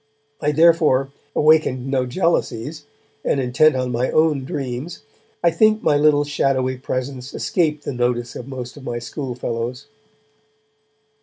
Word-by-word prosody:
I, 150 - +1
therefore, 155 -4 +4 0.2
awakened 150 -5 +3
no 135 -2 0
jealousies, 145 -2 -1 0.4
and, 140 - +1
intent 135 +4 +3
on 125 -1 -1
my 125 +2 0
own 155 -4 +2
dreams, 135 +4 -5 0.4
I 170 - +5
think 215 +5 +3
my 145 - +3
little 145 0 +4
shadowy 130 -3 0
presence 130 0 -5
escaped 155 -4 0
the - - -4
notice 120 -1 -1
of 125 - -7
most 130 -1 -7
of 145 - -11
my 120 -2 -3
schoolfellows. 125 0 -4
135 Hz, 135 wpm, -21 LUFS, 125-150 Hz, 0.4 s, I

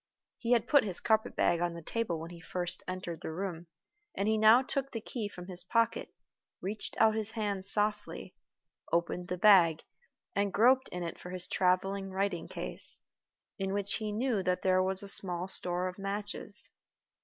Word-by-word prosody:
He 240 0 +1
had 235 - +2
put 285 -2 +5
his 190 -5 -3
carpet 220 -1 +1
bag 170 - +2
on 175 -1 -1
the 170 - -7
table 210 -4 -2
when 165 +2 -8
he 170 -1 -11
first 175 +1 -3
entered 185 -2 -5
the - - -5
room, 175 -1 -5 0.5
and 200 - -1
he 220 - +3
now 220 +4 +6
took 275 +1 -2
the 225 - -4
key 220 -1 -5
from 180 -3 -10
his 180 -1 -3
pocket, 230 +4 0 0.5
reached 205 +3 -4
out 220 -1 +5
his 220 -1 -1
hand 205 -4 -2
softly, 210 -1 0 0.6
opened 170 +1 -1
the 180 - -3
bag, 175 -5 +5 0.5
and 200 0 +1
groped 255 +6 +4
in 180 0 -5
it 170 - -6
for 180 - -9
his 180 -1 -1
traveling 195 +2 0
writing 190 -2 -2
case, - - +1 0.6
in 195 0 -2
which 200 0 0
he 215 -2 -4
knew 225 -1 0
that 180 0 -1
there 185 0 +3
was 190 +1 +3
a - - -5
small 180 -2 +3
store 180 -1 +1
of 185 +1 -7
matches. 205 +1 -3
195 Hz, 185 wpm, -31 LUFS, 180-215 Hz, 0.6 s, now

